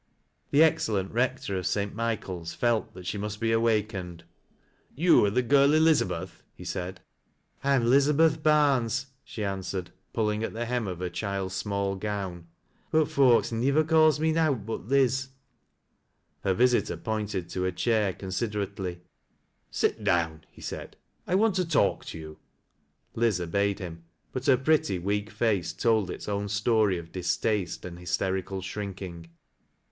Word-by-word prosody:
The 145 Hz, +3 st, +6 dB
excellent 105 Hz, -11 st, +1 dB
Eector 125 Hz, -5 st, 0 dB
oi. -, -, -1 dB
dt 100 Hz, +2 st, -1 dB
IHiehael's 100 Hz, -7 st, -3 dB
felt 120 Hz, -2 st, 0 dB
that 90 Hz, -, -10 dB
she 100 Hz, -, -3 dB
must 105 Hz, +1 st, -4 dB
be 115 Hz, +1 st, +1 dB
awakened. 105 Hz, -6 st, 0 dB, 0.4 s
" -, -, -35 dB
Ton 170 Hz, -10 st, +6 dB
are -, -, +2 dB
the 125 Hz, +5 st, +1 dB
girl 140 Hz, +3 st, +5 dB
Elizabeth? 160 Hz, -1 st, +2 dB
" -, -, -43 dB
he -, -, -9 dB
said. 90 Hz, +1 st, -5 dB, 0.3 s
" -, -, -37 dB
I'm 135 Hz, -3 st, +3 dB
'Lizabeth 150 Hz, +5 st, +4 dB
Barnes," 135 Hz, -5 st, +3 dB, 0.2 s
she 110 Hz, -, -6 dB
answered, 95 Hz, -2 st, -3 dB, 0.2 s
pulling 105 Hz, -1 st, 0 dB
at -, -, -3 dB
tht 120 Hz, +1 st, -3 dB
Utra 120 Hz, -3 st, -1 dB
of 90 Hz, -2 st, -5 dB
her 90 Hz, -, -2 dB
child's 95 Hz, -1 st, -3 dB
small 100 Hz, 0 st, -1 dB
gown, 95 Hz, -4 st, -4 dB, 0.2 s
" -, -, -39 dB
but 155 Hz, -1 st, +3 dB
folks 130 Hz, -5 st, +4 dB
nivver 135 Hz, +7 st, +2 dB
calls 155 Hz, -1 st, +4 dB
mo 160 Hz, +1 st, +2 dB
nowt 155 Hz, -9 st, +1 dB
but 110 Hz, -2 st, -5 dB
Liz." 130 Hz, -1 st, +2 dB, 1.2 s
Her 95 Hz, -1 st, +1 dB
visitor 125 Hz, +2 st, +2 dB
pointed 105 Hz, -5 st, -3 dB
to 90 Hz, 0 st, -2 dB
a 95 Hz, -, +1 dB
chair 105 Hz, +1 st, +1 dB
considerately. 95 Hz, -2 st, -4 dB, 0.4 s
" -, -, -46 dB, 0.2 s
Sil -, -, +3 dB
down," 80 Hz, -2 st, 0 dB
he -, -, -17 dB
said, -, -, -7 dB, 0.3 s
"I 180 Hz, -, +1 dB
want 215 Hz, +1 st, +3 dB
to 185 Hz, -, +2 dB
talk 165 Hz, -, +2 dB
to -, -, -7 dB
you." 80 Hz, -1 st, -10 dB, 0.7 s
Li/, 115 Hz, 0 st, +2 dB
obeyed 100 Hz, +3 st, 0 dB
him; 85 Hz, -4 st, -8 dB, 0.3 s
but 130 Hz, -, -4 dB
her 130 Hz, -2 st, +6 dB
pretty, 135 Hz, -8 st, +2 dB
weak 100 Hz, +4 st, -2 dB
face 110 Hz, -6 st, 0 dB
told 110 Hz, -5 st, +1 dB
its -, -, -6 dB
own 100 Hz, 0 st, -2 dB
story 105 Hz, -1 st, +2 dB
of 85 Hz, 0 st, -9 dB
distaste 95 Hz, +2 st, -1 dB
and 85 Hz, -1 st, -8 dB
hysterical 95 Hz, +1 st, -2 dB
shrinking. 95 Hz, -4 st, -6 dB
105 Hz, 160 wpm, -27 LUFS, 95-130 Hz, 1.2 s, The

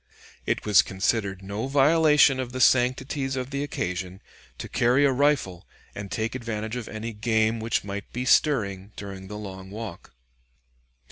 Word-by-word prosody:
It -, -, -1 dB
was 105 Hz, -3 st, +6 dB
considered 95 Hz, 0 st, -1 dB
no 100 Hz, +5 st, -4 dB
violation 150 Hz, 0 st, +4 dB
of 125 Hz, -1 st, -4 dB
the 130 Hz, -, -4 dB
sanctities 130 Hz, +2 st, +2 dB
of 130 Hz, +1 st, -4 dB
the 140 Hz, 0 st, -2 dB
occasion 90 Hz, -8 st, -4 dB, 0.4 s
to -, -, -6 dB
carry 125 Hz, +4 st, +3 dB
a 140 Hz, -, +4 dB
rifle 130 Hz, -10 st, 0 dB, 0.3 s
and 100 Hz, -1 st, -7 dB
take 110 Hz, +3 st, -2 dB
advantage 115 Hz, -2 st, -4 dB
of 125 Hz, -3 st, -5 dB
any 110 Hz, +1 st, -6 dB
game 110 Hz, +1 st, +1 dB
which 110 Hz, 0 st, -1 dB
might 100 Hz, 0 st, -6 dB
be 125 Hz, +1 st, -4 dB
stirring 105 Hz, -9 st, +2 dB
during 95 Hz, -1 st, -8 dB
the 105 Hz, +2 st, -7 dB
long 95 Hz, -2 st, -8 dB
walk. 105 Hz, -3 st, -8 dB
110 Hz, 155 wpm, -25 LUFS, 100-130 Hz, 0.4 s, was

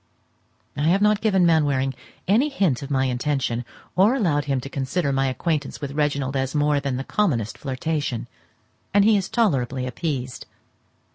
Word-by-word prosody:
I 145 Hz, +2 st, 0 dB
have 195 Hz, +4 st, +3 dB
not 210 Hz, 0 st, +3 dB
given 195 Hz, -5 st, +3 dB
Mainwaring 145 Hz, -5 st, +2 dB, 0.3 s
any 235 Hz, +10 st, +3 dB
hint 185 Hz, -, 0 dB
of 140 Hz, -, -7 dB
my 135 Hz, -2 st, +1 dB
intention, 125 Hz, -1 st, -1 dB, 0.3 s
or 205 Hz, +7 st, +4 dB
allowed 155 Hz, -, +1 dB
him 135 Hz, -2 st, 0 dB
to 135 Hz, -, -7 dB
consider 140 Hz, +2 st, -1 dB
my 135 Hz, 0 st, +1 dB
acquaintance 145 Hz, +2 st, -2 dB
with 140 Hz, -2 st, -5 dB
Reginald 140 Hz, -2 st, -1 dB
as 135 Hz, +2 st, -1 dB
more 145 Hz, -1 st, +2 dB
than 140 Hz, -2 st, -2 dB
the 135 Hz, -, -3 dB
commonest 135 Hz, -, 0 dB
flirtation, 135 Hz, -3 st, -3 dB, 0.7 s
and 205 Hz, 0 st, +6 dB
he 220 Hz, 0 st, +5 dB
is 195 Hz, -2 st, -1 dB
tolerably 135 Hz, -, 0 dB
appeased. 130 Hz, -1 st, -4 dB
145 Hz, 160 wpm, -23 LUFS, 135-180 Hz, 0.7 s, and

